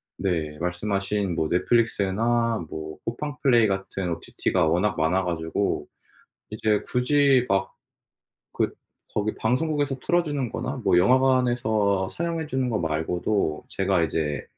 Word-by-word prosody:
네 80 Hz, -6 st, -2 dB
말씀하신 100 Hz, +2 st, -1 dB
뭐 80 Hz, -1 st, -1 dB
넷플릭스나 115 Hz, +2 st, +1 dB
뭐 80 Hz, 0 st, -7 dB
쿠팡플레이 125 Hz, -2 st, +1 dB
같은 95 Hz, -2 st, -3 dB
OTT가 85 Hz, +1 st, -1 dB
워낙 90 Hz, +6 st, +1 dB
많아 90 Hz, +4 st, +1 dB
가지고 80 Hz, -2 st, -1 dB, 0.6 s
이제 105 Hz, 0 st, 0 dB
굳이 135 Hz, 0 st, +3 dB
막 95 Hz, 0 st, 0 dB, 0.8 s
그 -, -, 0 dB, 0.4 s
거기 105 Hz, +1 st, 0 dB
방송국에서 140 Hz, +3 st, 0 dB
틀어주는 145 Hz, -5 st, 0 dB
거나 -, -, -4 dB
뭐 -, -, +3 dB
영화관에서 120 Hz, -4 st, +2 dB
상영해 165 Hz, -, -3 dB
주는 130 Hz, -3 st, -1 dB
것 110 Hz, -, 0 dB
말고도 80 Hz, +1 st, -1 dB
제가 95 Hz, -2 st, +1 dB
이제 75 Hz, -3 st, -2 dB
105 Hz, 280 characters per minute, -25 LUFS, 90-125 Hz, 0.8 s, 굳이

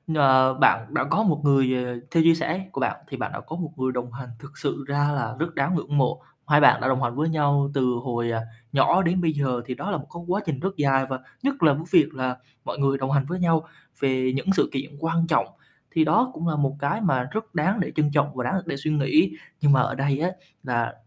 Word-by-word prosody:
Ờ, 130 Hz, -2 st, +5 dB
bạn 115 Hz, -3 st, +2 dB
đã -, -, +1 dB
có 175 Hz, +10 st, +1 dB
một 155 Hz, -7 st, +1 dB
người, 135 Hz, -3 st, +3 dB
ờ, 125 Hz, -1 st, -5 dB
theo 165 Hz, -1 st, +4 dB
chia 165 Hz, 0 st, +6 dB
sẻ 170 Hz, +4 st, -2 dB
của -, -, -5 dB
bạn -, -, 0 dB
thì -, -, -6 dB
bạn -, -, -4 dB
đã -, -, -5 dB
có 160 Hz, -, -8 dB
một 165 Hz, -3 st, -5 dB
người 130 Hz, 0 st, -1 dB
đồng 125 Hz, -1 st, -4 dB
hành, 125 Hz, 0 st, -8 dB
thực 140 Hz, +4 st, -14 dB
sự 140 Hz, -1 st, -3 dB
ra 145 Hz, +1 st, +1 dB
là 120 Hz, -4 st, -3 dB
rất 165 Hz, 0 st, -3 dB
đáng 155 Hz, +6 st, 0 dB
ngưỡng 145 Hz, -2 st, -2 dB
mộ. 130 Hz, -1 st, +1 dB, 0.3 s
Hai 150 Hz, -1 st, +5 dB
bạn 145 Hz, -, +6 dB
đã -, -, 0 dB
đồng 130 Hz, 0 st, +1 dB
hành 120 Hz, 0 st, -1 dB
với 155 Hz, +3 st, 0 dB
nhau 145 Hz, -3 st, +1 dB
từ 135 Hz, -, 0 dB, 0.2 s
hồi, 120 Hz, -2 st, -2 dB
ờ, 115 Hz, -1 st, -1 dB, 0.3 s
nhỏ 140 Hz, +6 st, +4 dB
đến 180 Hz, 0 st, +1 dB
bây 165 Hz, -2 st, +2 dB
giờ 130 Hz, -4 st, -1 dB
thì 125 Hz, -, -5 dB
đó 205 Hz, -, -4 dB
là 200 Hz, -, 0 dB
một 145 Hz, -1 st, -9 dB
cái 170 Hz, -, -8 dB
quá 190 Hz, +4 st, 0 dB
trình 150 Hz, -5 st, -2 dB
rất 195 Hz, +3 st, -3 dB
dài. 135 Hz, -2 st, +2 dB
Và 130 Hz, -1 st, -3 dB, 0.2 s
nhất 275 Hz, +1 st, -1 dB
là 150 Hz, -3 st, +6 dB
cái 150 Hz, +3 st, -4 dB
việc 160 Hz, -4 st, +4 dB
là 130 Hz, -2 st, -3 dB, 0.3 s
mọi -, -, -4 dB
người 135 Hz, 0 st, +2 dB
đồng 135 Hz, 0 st, -2 dB
hành 140 Hz, -1 st, +2 dB
với 180 Hz, +5 st, -4 dB
nhau 165 Hz, -3 st, +2 dB, 0.4 s
về 130 Hz, -2 st, +1 dB
những 135 Hz, -, -4 dB
sự -, -, +2 dB
kiện 140 Hz, +3 st, -4 dB
quan 165 Hz, +1 st, 0 dB
trọng 160 Hz, -, +2 dB, 0.4 s
thì 160 Hz, -, +3 dB
đó 200 Hz, +12 st, +3 dB
cũng 170 Hz, -, -4 dB
là 160 Hz, -, 0 dB
một 140 Hz, -2 st, 0 dB
cái 140 Hz, +10 st, -1 dB
mà 150 Hz, -, +1 dB
rất 220 Hz, -3 st, -5 dB
đáng 190 Hz, +7 st, +1 dB
để 185 Hz, -, -1 dB
trân 150 Hz, -1 st, +2 dB
trọng 145 Hz, -1 st, +1 dB
và 125 Hz, -, -3 dB
đáng 155 Hz, -, -1 dB
để 150 Hz, -5 st, -4 dB
suy 155 Hz, +3 st, -2 dB
nghĩ. 155 Hz, +4 st, +3 dB, 0.3 s
Nhưng 145 Hz, -1 st, +4 dB
mà 130 Hz, -2 st, +5 dB
ở 135 Hz, +2 st, -1 dB
đây 140 Hz, +1 st, 0 dB
á 170 Hz, +3 st, +1 dB, 0.3 s
là 120 Hz, -3 st, -1 dB
145 Hz, 260 wpm, -24 LUFS, 130-165 Hz, 0.4 s, chia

